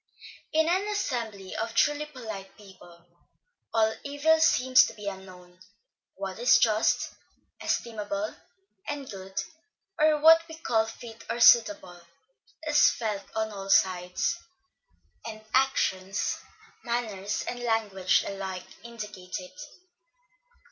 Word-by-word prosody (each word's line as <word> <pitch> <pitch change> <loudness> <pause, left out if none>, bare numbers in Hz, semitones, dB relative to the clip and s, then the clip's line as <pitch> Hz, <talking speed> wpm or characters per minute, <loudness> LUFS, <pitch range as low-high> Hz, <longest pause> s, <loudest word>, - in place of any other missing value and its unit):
In 320 0 +3
an 375 +4 +1
assembly 235 - -3
of 225 +1 -3
truly 295 +1 +2
polite 220 -9 -9
people, 180 -4 -16 0.7
all 220 -1 +2
evil 290 +3 +2
seems 260 -5 +5
to - - -9
be 210 -1 -8
unknown; 185 -2 -9 0.6
what 195 +1 -6
is 245 - +6
just, 215 -1 +2 0.5
estimable, 210 -2 -2 0.5
and 290 -2 -4
good, 190 -2 -6 0.6
or 305 0 +4
what 325 +2 +8
we 320 - -8
call 225 -9 0
fit 225 0 -10
or 235 - -2
suitable, 205 -7 +5 0.6
is 300 -1 +5
felt 210 -4 -3
on 220 0 -1
all 195 -1 -7
sides; 180 - +2 0.8
and 215 -1 -8
actions, 205 -7 +1 0.4
manners 215 -5 -2
and 245 - -4
language 215 -5 +1
alike 190 -2 -5 0.2
indicate 210 -6 -8
it. 185 +11 -12
220 Hz, 115 wpm, -27 LUFS, 195-255 Hz, 0.8 s, what